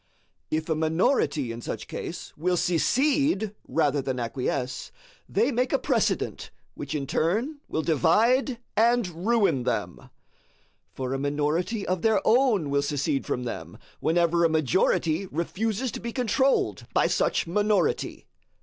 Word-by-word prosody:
If 155 0 -1
a 160 - +1
minority 160 - +1
in 115 +1 -7
such - - -5
case - - -6
will 180 +3 0
secede 240 - +1
rather 145 -3 +1
than 130 -1 -3
acquiesce, 125 +2 -3 0.4
they 230 +7 +2
make 250 +1 0
a 275 - +3
precedent - - -1 0.2
which - - -5
in 140 -2 -2
turn 215 - 0
will 155 - -2
divide 225 - +3 0.2
and 235 -1 +3 0.2
ruin 215 - +3
them; - - -3 0.8
for 130 0 -4
a 135 - -2
minority 150 - -1
of 185 -1 -1
their 220 -2 +3
own 220 - +3
will 140 0 +2
secede 140 -1 -1
from 125 - -2
them 120 - -6 0.2
whenever 170 +1 +2
a 165 - +4
majority 160 +3 +1
refuses 215 - -2
to - - -6
be 235 - -5
controlled 260 +2 +1
by - - +4
such - - +1
minority. 205 +1 0
170 Hz, 140 wpm, -26 LUFS, 145-225 Hz, 0.8 s, a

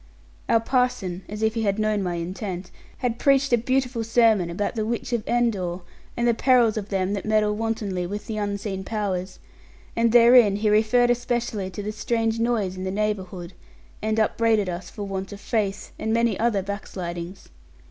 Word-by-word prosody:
Our 230 - +5
parson 225 -7 0
(as 210 +2 -5
if 220 0 +2
he 230 - -2
had 200 -2 +1
known 215 -1 +1
my 180 -2 -2
intent) 180 +2 -5 0.3
had 235 -1 -1
preached 275 -1 +3
a - - +9
beautiful 250 -1 0
sermon 225 -5 +3
about 190 +4 -2
the 220 -2 -2
Witch 235 +2 -3
of 235 -3 0
Endor, 200 -7 0 0.4
and 235 0 +1
the 235 - +4
perils 240 -2 +4
of 210 -2 -4
them 195 0 0
that 200 - -3
meddle 215 -1 +2
wantonly 210 -5 -2
with 205 +3 -5
the 220 - -4
unseen 200 -2 -3
Powers; 195 -3 -3 0.6
and 230 0 +2
therein 235 -3 +7
he 210 +1 +1
referred 240 +3 +4
especially 240 -5 -1
to 195 +2 -6
the 210 - -3
strange 225 +1 -1
noise 225 -6 0
in 185 - -6
the 190 - -2
neighbourhood, 190 -3 -3 0.5
and 220 0 -1
upbraided 220 -2 +2
us 175 0 -5
for 205 - -7
want 195 0 -4
of 200 - -9
faith, 205 -2 -2
and 220 - -2
many 230 -2 +2
other 220 -4 +1
backslidings. 185 -2 -6
215 Hz, 180 wpm, -24 LUFS, 195-230 Hz, 0.6 s, a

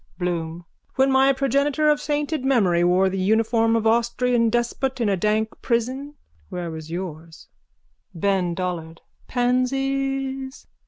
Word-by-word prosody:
BLOOM: 170 -1 -3 0.3
When 265 +1 +3
my 265 +1 +5
progenitor 280 +3 +1
of 295 0 +3
sainted 295 -1 -2
memory 200 -11 +3
wore 180 +2 +3
the 190 0 -2
uniform 225 +3 +2
of 225 - +1
the 220 - +4
Austrian 235 0 +1
despot 240 +3 -1
in 230 -3 +1
a 195 - +2
dank 215 +4 +1
prison 260 +5 -2 0.3
where 175 -2 -4
was 160 0 -8
yours? 165 -2 -7 0.7
BEN 180 -1 0
DOLLARD: 165 -2 -4 0.3
Pansies? 270 +2 -1
230 Hz, 130 wpm, -23 LUFS, 180-270 Hz, 0.7 s, my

